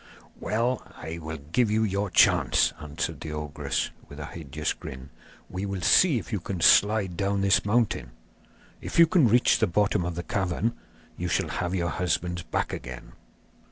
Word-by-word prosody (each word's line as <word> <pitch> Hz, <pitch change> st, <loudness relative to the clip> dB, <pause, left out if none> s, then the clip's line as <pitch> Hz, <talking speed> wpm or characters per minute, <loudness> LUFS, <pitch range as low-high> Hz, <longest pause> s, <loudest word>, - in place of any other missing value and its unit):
'Well, 115 Hz, +4 st, -1 dB
I 80 Hz, +1 st, -7 dB
will 80 Hz, 0 st, -6 dB
give 80 Hz, -, 0 dB
you 110 Hz, +1 st, +2 dB
your 100 Hz, -1 st, -1 dB
chance,' -, -, +4 dB
answered 75 Hz, +1 st, -4 dB
the 75 Hz, -, -6 dB
ogress, 75 Hz, -2 st, -3 dB, 0.2 s
with 70 Hz, -, -10 dB
a 75 Hz, -, -5 dB
hideous 75 Hz, -1 st, -4 dB
grin; 65 Hz, +1 st, -10 dB, 0.4 s
'we 95 Hz, +2 st, -4 dB
will 95 Hz, -2 st, -4 dB
see 170 Hz, -8 st, +5 dB
if 115 Hz, -, -6 dB
you 105 Hz, -, 0 dB
can 90 Hz, +1 st, -5 dB
slide 100 Hz, +2 st, +4 dB
down 100 Hz, +1 st, 0 dB
this 100 Hz, 0 st, +3 dB
mountain. 110 Hz, -, 0 dB, 0.7 s
If -, -, -6 dB
you 170 Hz, -, +9 dB
can 160 Hz, -5 st, +4 dB
reach 120 Hz, +3 st, +4 dB
the -, -, +3 dB
bottom 105 Hz, +1 st, +1 dB
of 85 Hz, -1 st, -3 dB
the 85 Hz, -, -4 dB
cavern, 95 Hz, +5 st, -1 dB, 0.4 s
you -, -, -3 dB
shall -, -, 0 dB
have 90 Hz, 0 st, -2 dB
your 85 Hz, -2 st, -1 dB
husbands 90 Hz, 0 st, -1 dB
back 85 Hz, -, -3 dB
again. 65 Hz, -1 st, -8 dB
95 Hz, 175 wpm, -26 LUFS, 80-105 Hz, 0.7 s, you